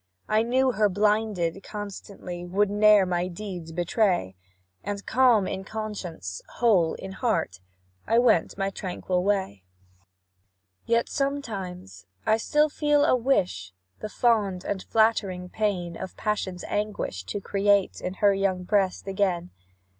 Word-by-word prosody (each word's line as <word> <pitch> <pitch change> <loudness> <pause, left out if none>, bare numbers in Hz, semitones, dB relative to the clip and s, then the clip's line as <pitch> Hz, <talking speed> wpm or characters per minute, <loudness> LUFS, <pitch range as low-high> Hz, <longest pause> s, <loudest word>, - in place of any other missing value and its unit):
I 215 +1 +3
knew 255 +3 +2
her 210 -2 +2
blinded 205 -3 +1
constancy 195 -3 -7
Would 195 +3 +1
ne'er 210 -1 +6
my 180 0 -1
deeds 180 -3 -7
betray, 175 - 0 0.5
And, 200 0 -4
calm 240 -4 +4
in 190 - -4
conscience, 190 - -6
whole 195 -9 +3
in 190 - -8
heart. 195 - -1 0.5
I 230 - +3
went 235 -10 +3
my 195 0 -1
tranquil 180 -1 -2
way. 190 - -1 1.2
"Yet, 235 0 +2
sometimes, 195 - -4 0.2
I 220 - +4
still 300 +6 +2
feel 295 -1 +2
a - - +4
wish, 225 - 0 0.3
The 215 - -5
fond 205 -6 +1
and 200 -2 -2
flattering 200 -5 +1
pain 180 -6 -2
Of 190 +1 -8
passion's 190 -4 -2
anguish 205 - -3
to 205 - -4
create 200 0 +1
In 180 +1 -4
her 200 0 +4
young 195 -2 0
breast 195 -1 +1
again. 190 -3 -1
200 Hz, 130 wpm, -26 LUFS, 180-215 Hz, 1.2 s, ne'er